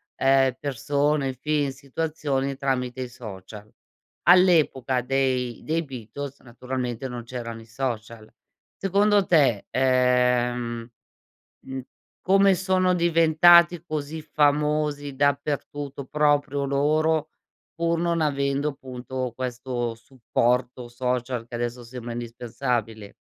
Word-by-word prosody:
ehm, 135 -1 +3
persone, 140 +1 0
film, 145 +2 -1
situazioni 140 0 -3
tramite 130 -2 -2
i 125 - -7
social. 105 -2 -10 0.5
All'epoca 160 -8 +4
dei 125 -2 -1
dei 165 +2 -1
Beatles 135 +1 -8
naturalmente 125 0 -4
non 120 -2 -6
c'erano 115 -2 -6
i - - -14
social. 115 -2 -5 0.5
Secondo 200 +1 +3
te, 135 - +3
ehm, 125 -2 +1 0.7
mhmm, 130 0 -6 0.4
come 195 +1 +4
sono 185 0 +2
diventati 170 0 +5
così 155 0 -4
famosi 150 -1 0
dappertutto 140 0 -1
proprio 145 0 +1
loro, 155 +3 +1 0.4
pur 170 0 0
non 170 -1 0
avendo, 140 -1 0
punto, 130 -1 -5
questo 125 -2 -3
supporto 125 +1 -1
social 125 0 -2
che 120 - -12
adesso 120 +1 -3
sembra 120 0 -7
indispensabile? 115 -2 -4
135 Hz, 100 wpm, -25 LUFS, 125-150 Hz, 0.7 s, diventati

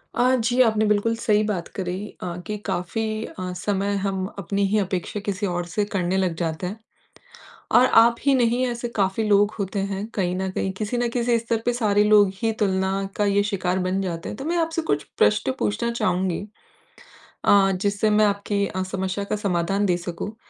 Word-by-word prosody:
अ, 255 +1 +3
जी 245 +1 +2
आपने 220 -3 +3
बिल्कुल 210 +2 +2
सही 210 -1 +3
बात 195 -5 -2
करी 180 -1 -2 0.2
अ, 175 -1 -4
कि 210 -1 -3
काफ़ी 215 +4 -2
अ, 185 -1 -6
समय 200 0 0
हम 190 -1 -1
अपनी 200 +2 0
ही 215 - +1
अपेक्षा 190 +1 -2
किसी 200 0 -2
और 175 0 -2
से 210 +2 0
करने 185 +1 0
लग 185 -3 0
जाते 165 +2 -2
हैं। 210 +4 -6 1.0
और 250 - +7 0.2
आप 235 0 +4
ही 280 0 +3
नहीं 245 +1 +2
ऐसे 240 0 -3
काफ़ी 195 +2 +1
लोग 205 0 +4
होते 195 +1 -2
हैं 195 +1 -3
कहीं 180 -3 0
न 190 0 -2
कहीं 190 0 -2
किसी 215 +3 -2
न 240 0 +1
किसी 240 -1 +2
स्तर 230 0 -1
पे 245 - +2
सारे 210 -4 +2
लोग 210 -2 +5
ही 225 -1 +2
तुलना 190 -1 +1 0.3
का 210 - +2
ये 200 0 +2
शिकार 185 -2 -1
बन 185 +1 0
जाते 170 -3 -4
हैं। - - -5
तो 270 - -6
मैं 345 +1 0
आपसे 330 0 0
कुछ 145 - +1
प्रश्न 105 +5 +3
पूछना 105 - 0
चाहूँगी 185 -5 0 1.1
अ, 195 -1 +5
जिससे 205 +1 +1
मैं 210 0 +4
आपकी 200 0 0
अ, 185 - -3
समस्या 190 +1 -3
का - - +2
समाधान 195 +3 +1
दे 180 -2 +2
सकूँ। 190 +5 -5
200 Hz, 195 wpm, -23 LUFS, 185-220 Hz, 1.1 s, और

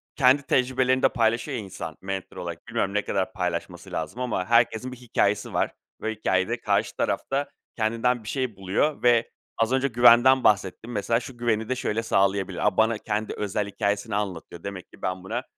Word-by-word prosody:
kendi 135 +1 +5
tecrübelerini 130 0 +2
de - - +6
paylaşıyor 120 +3 0
ya 110 - -4
insan, 90 -5 -7
mental 95 0 -5
olarak. 85 +1 -6
Bilmiyorum 115 -4 -1
ne 105 0 +1
kadar 95 -1 -1
paylaşması 90 0 -4
lazım 85 +8 -4
ama 115 -7 -1
herkesin 120 +2 +2
bir 125 - -9
hikâyesi 110 -4 0
var - - +1 0.3
ve 110 - -1
hikâyede, 105 +3 0
karşı 100 -1 0
tarafta 140 +1 -1 0.3
kendinden 115 +2 +1
bir 105 - -7
şey 130 -2 -2
buluyor 95 +12 0
ve 120 -1 +4 0.3
az 115 +1 +1
önce 130 +1 +2
güvenden 120 +2 +6
bahsettin. 105 +3 +1
Mesela, 115 +2 +1
şu 125 0 -10
güveni 110 -1 0
de 130 - +1
şöyle 115 -2 -1
sağlayabilir. 95 -2 +1
A, - - 0
bana 110 0 +3
kendi 105 0 -3
özel 105 0 -2
hikâyesini 100 -1 -1
anlatıyor. 90 -4 -4
Demek 100 -2 -7
ki - - -17
ben 95 0 -3
buna 115 +6 -3
110 Hz, 180 wpm, -25 LUFS, 95-120 Hz, 0.3 s, de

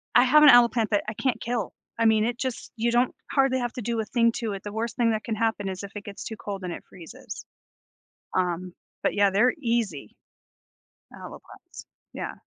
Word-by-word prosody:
I - - +8
have 300 +4 +6
an 295 - +10
aloe 245 -2 +8
plant 230 -3 -1
that 205 - +2
I 215 - -3
can't 240 +3 -1
kill, 235 -4 -2 0.3
I 230 - +3
mean, 220 -1 +4
it 240 +1 -2
just 260 -2 -4
you 235 +1 +1
don't 240 +1 +2 0.2
hardly 270 -2 +2
have 240 -1 -3
to 250 - -5
do 230 +1 -2
a 220 - -1
thing 230 +1 +2
to 225 -3 -3
it, 195 - -7
the 205 - -6
worst 225 +1 -3
thing 235 -2 +2
that 215 -1 -2
can 225 - -3
happen 220 -2 -1
is 190 +1 -6
if 200 - -8
it 205 - -7
gets 200 -1 -8
too 220 - -6
cold 200 -3 -6
and 180 -1 -3
it - - -9
freezes, 170 -4 -10 0.9
um, 180 0 -1 0.3
but - - +1
yeah, 205 -1 +4
they're 215 +6 +3
easy, 225 - -2 1.0
a - - -9
loe - - -11
plants, - - -14 0.3
yeah. - - -5
225 Hz, 225 wpm, -26 LUFS, 200-240 Hz, 1.0 s, an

